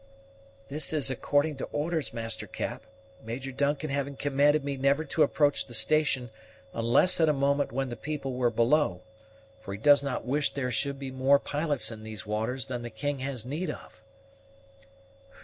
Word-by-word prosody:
"This 150 +4 -2
is 140 -4 +2
according 145 +3 +1
to - - -3
orders, 155 0 -2
Master 115 -1 -3
Cap, - - -5 0.4
Major 125 +4 -5
Duncan 145 +2 0
having 140 0 -2
commanded 145 +2 +2
me 140 0 -2
never 140 +3 +2
to 155 - -1
approach 145 -6 +3
the 120 - -4
station 140 -3 +2 0.4
unless 115 +11 +3
at 160 - +5
a - - +4
moment 140 -1 +1
when 135 +2 -1
the 120 - -4
people 140 +1 -4
were 125 -1 +2
below; 115 - +2 0.6
for 100 - -7
he - - -9
does 145 +4 +6
not 140 -3 -3
wish 140 +3 0
there 130 -3 -1
should 140 +3 -1
be 135 -1 -6
more 130 +2 +4
pilots 145 -2 -1
in 110 -1 -9
those 110 -3 -7
waters 110 +5 -2
than 125 -3 -4
the 120 - -5
king 145 +5 -3
has 130 -3 -2
need 155 +8 -3
of." - - -9
135 Hz, 175 wpm, -28 LUFS, 120-145 Hz, 0.6 s, does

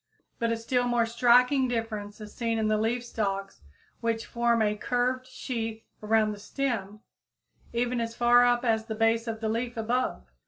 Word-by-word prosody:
But 230 -1 +1
a 230 - 0
still 245 +2 0
more 240 -1 +2
striking 250 +3 +4
difference 225 -4 -4
is 210 -1 -10
seen 230 -1 -1
in 220 -1 +1
the 215 - +2
leaf 235 +3 -1
stalks 195 - -3 0.4
which 230 -1 -1
form 235 -1 +1
a 210 0 +1
curved 250 +3 -1
sheath 225 -4 -5 0.2
around 215 0 +2
the 205 - -7
stem 215 -3 -3 0.7
even 240 0 0
as 230 0 -4
far 240 0 +5
up 245 0 +2
as 220 -1 +1
the 220 - -3
base 225 +1 +2
of 225 -1 -4
the 220 - -1
leaf 235 +2 -2
above. 225 - -1
230 Hz, 180 wpm, -28 LUFS, 220-245 Hz, 0.7 s, far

